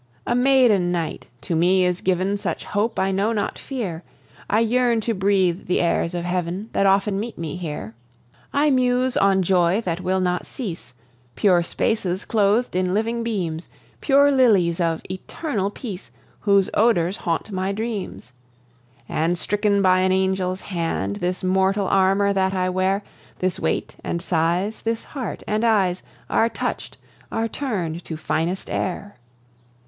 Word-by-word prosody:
A - - 0
maiden 245 -8 +4
knight 170 -3 -3
to 165 +4 -2
me 180 +3 +3
is 180 0 0
given 190 +2 +1
Such - - -3
hope, 210 +3 -1
I 190 0 +1
know 200 +4 +1
not 205 -2 -2
fear; 205 -12 -4 0.5
I 210 - +3
yearn 240 0 +2
to 230 +1 -1
breathe 190 -2 +1
the 180 - +1
airs 170 0 0
of 175 0 -3
heaven 180 +4 -3
That 195 - +3
often 195 +1 +2
meet 230 +2 -5
me 160 -3 -4
here. 150 - -5 0.6
I 290 +1 +3
muse 255 0 +2
on 195 -1 +3
joy 180 +1 +3
that 175 -4 -3
will 185 +1 0
not 180 -1 -1
cease, 170 - -7 0.4
Pure 180 -4 +4
spaces 185 +1 -1
cloth'd 215 +1 +1
in 185 0 +1
living 230 +2 0
beams, 180 -8 -3 0.3
Pure 280 0 +4
lilies 205 -11 +3
of 165 -2 0
eternal 200 - -3
peace, 205 -4 -8 0.3
Whose 200 -2 +3
odours 205 -5 +2
haunt 170 +4 -2
my 190 0 -1
dreams; 205 - -5 0.8
And, 165 +3 0
stricken 205 +1 +1
by 185 0 +5
an 185 0 +2
angel's 190 0 0
hand, 165 - -2
This 180 +1 -2
mortal 190 +2 +2
armour 195 +1 +3
that 190 0 +1
I 185 0 +1
wear, 190 +2 0 0.3
This 185 -1 -1
weight - - -2
and 170 - -2
size, 175 +4 0
this 230 0 -2
heart 255 -9 -6
and 215 +1 -1
eyes, 195 -6 +2 0.3
Are 230 - +2
touch'd, - - -4 0.3
are 225 0 0
turn'd 185 - -3
to 160 - -5
finest 165 +4 -2
air. 200 +3 -3
190 Hz, 155 wpm, -22 LUFS, 180-215 Hz, 0.8 s, by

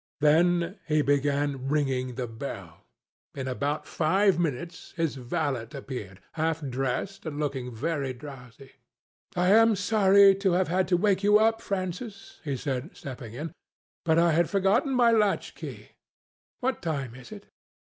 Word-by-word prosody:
Then 170 +5 +3
he 155 -1 +2
began 140 -1 0
ringing 130 -4 0
the 125 - -3
bell. 110 - -8 0.5
In 135 -2 -4
about 140 +4 -2
five 185 +3 +2
minutes 170 +3 -4
his 165 -3 0
valet 130 -2 -2
appeared, 125 -9 -7
half 160 -1 -1
dressed 135 +9 -3
and 145 -2 -5
looking 135 -4 -3
very 140 +3 -2
drowsy. 130 -1 -11 0.6
"I 180 +1 +2
am 225 +1 +6
sorry 200 -1 +5
to 195 -2 +1
have 180 0 +1
had 185 +2 +1
to 180 - +3
wake 195 0 +2
you 205 +1 +5
up, 225 +1 +2
Francis," 195 +2 -5
he 140 -4 -2
said, 135 +4 -4
stepping 120 -4 -8
in; 155 +5 -5 0.5
"but 160 -1 +2
I 170 0 +4
had 165 +1 +2
forgotten 205 +8 +2
my 240 -2 +5
latch 210 -3 +1
key. - - -9 0.7
What 255 -1 -1
time 140 -8 -3
is 130 - -13
it?" 205 -1 -10
160 Hz, 150 wpm, -27 LUFS, 135-195 Hz, 0.7 s, am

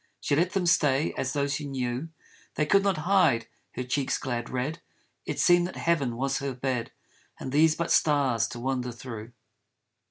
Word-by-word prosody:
She - - 0
let 175 +5 +1
them 190 -3 0
stay 150 -4 +3
as 130 - -2
though 140 -1 +1
she 140 +1 -3
knew 130 +2 -3 0.5
They 155 - +1
could 195 +6 +4
not 195 -3 +1
hide 180 -12 +3 0.3
her 125 - -3
cheek's 130 +2 -1
glad 120 -3 -3
red, 135 +6 -3 0.5
It - - -3
seemed 175 0 +5
that - - -9
heaven 140 -9 0
was 135 +2 0
her 135 -2 -3
bed 125 -2 -2 0.5
And 130 - -5
these 155 +2 +4
but 170 - -2
stars 140 -7 +3
to 120 - -8
wander 125 0 -2
through. 115 -1 -8
135 Hz, 180 wpm, -27 LUFS, 125-160 Hz, 0.5 s, seemed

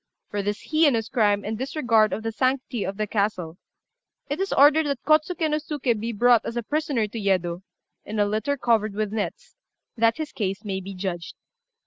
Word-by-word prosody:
For 205 - -1
this 205 +6 -4
heinous 285 -8 +3
crime 205 -4 +2
and 215 +2 -2
disregard 245 -6 +2
of 220 - -3
the 225 - -2
sanctity 255 -1 -1
of 195 - -4
the 215 - 0
castle, 195 -5 -2 0.7
it 290 - -1
is 390 0 -1
ordered 295 +2 +5
that 280 -3 -3
Kôtsuké 310 +3 +2
no 300 - +2
Suké 290 -7 -1
be 230 +2 -3
brought 240 +1 +4
as 235 - -5
a 240 - -1
prisoner 290 -4 0
to 225 +2 -6
Yedo, 180 -3 0 0.4
in 215 - -6
a 205 - +3
litter 220 +8 -1
covered 220 -5 +1
with 215 -1 -2
nets, 215 -2 -4 0.4
that 230 +1 +2
his 310 -2 -4
case 200 0 -3
may 190 -2 -3
be 195 +1 -8
judged. 180 -3 -4
225 Hz, 190 wpm, -24 LUFS, 205-275 Hz, 0.7 s, ordered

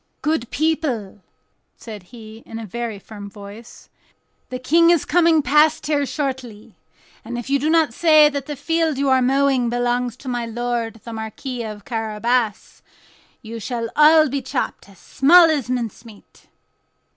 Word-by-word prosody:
"Good 300 -6 -1
people," 260 -8 -2 0.6
said 215 -3 -9
he, 225 -1 -12
in 225 - -7
a 225 - -6
very 230 +1 -5
firm 205 0 -10
voice, 205 +3 -13 0.6
"the 255 - -4
King 330 +7 +3
is 340 -4 +3
coming 330 -2 +3
past 300 +4 +3
here 285 -2 0
shortly, 260 -8 -5 0.5
and 240 - -6
if 240 +3 -6
you 280 - +3
do 300 +3 -1
not 320 -6 +2
say 310 0 +5
that 280 -1 -4
the 295 - -4
field 320 +1 -1
you 275 0 0
are 260 -1 +4
mowing 265 -1 +2
belongs 245 0 -1
to 265 - -13
my 245 -1 -2
lord 230 -1 -3
the 230 - -8
Marquis 225 +3 -6
of 215 -2 -7
Carabas, 225 0 -2 0.6
you 225 +1 -7
shall 230 0 -4
all 310 +1 +6
be 275 0 -3
chopped 260 -5 -4
as 195 - -18
small 325 - +5
as 280 -6 -2
mincemeat." 230 -3 -7
250 Hz, 155 wpm, -20 LUFS, 225-295 Hz, 0.6 s, all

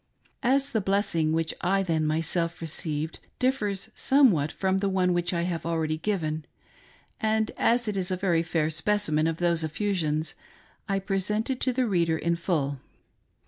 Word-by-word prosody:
As 270 +2 +2
the 220 - +1
"bless 200 +1 +1
ing" 160 -2 +2
which 165 0 0
I 195 +2 +2
then 160 -4 0
myself 165 +2 0
received 160 -1 -3 0.2
differs 220 -5 -1
somewhat 220 - +3
from 190 0 0
the 200 0 0
one 185 -1 +2
which 175 0 0
I 170 -1 0
have 170 -2 -2
already 160 -2 -1
given, 160 -6 -2 0.7
and 220 -1 +1
as 240 0 +2
it 210 - -1
is 185 -2 -1
a 185 - -1
very 175 -3 +2
fair 165 -2 0
speci 205 +3 0
men 155 +1 +2
of 165 -1 -1
those 170 -2 +1
effusions, 160 -3 -1 0.6
I 195 - +2
present 200 +4 -1
it 260 - -2
to 260 - +2
the 250 0 +1
reader 170 -6 +1
in 170 +1 0
full. 150 -5 -1
175 Hz, 175 wpm, -27 LUFS, 160-205 Hz, 0.7 s, somewhat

